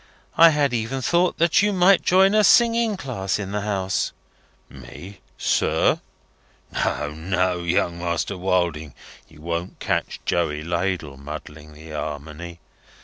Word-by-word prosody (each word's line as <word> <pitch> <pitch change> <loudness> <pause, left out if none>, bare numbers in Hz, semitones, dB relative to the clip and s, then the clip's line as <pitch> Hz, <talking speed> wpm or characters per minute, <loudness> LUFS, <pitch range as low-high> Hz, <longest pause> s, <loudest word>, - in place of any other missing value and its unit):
I 165 0 +8
had 145 -4 +1
even 120 +3 -2
thought 175 +6 +2
that 170 +2 +3
you 205 0 +2
might 190 0 +4
join 190 +2 +4
a 215 0 +4
singing 230 -1 +4
class 115 - -3
in 100 -2 -5
the 105 0 -2
house." 95 -2 -1 0.5
"Me, 95 +2 -12 0.2
sir? - - +1 0.7
No, 75 0 -1
no, 90 +3 -1
Young 85 0 0
Master 85 +3 -2
Wilding, 85 -5 -1 0.3
you 75 -1 -18
won't 85 +2 -4
catch - - -2
Joey 75 -3 -1
Ladle 85 -4 -2
muddling 75 +1 -9
the 80 +1 -12
Armony. 75 +3 -6
90 Hz, 135 wpm, -23 LUFS, -, 0.7 s, I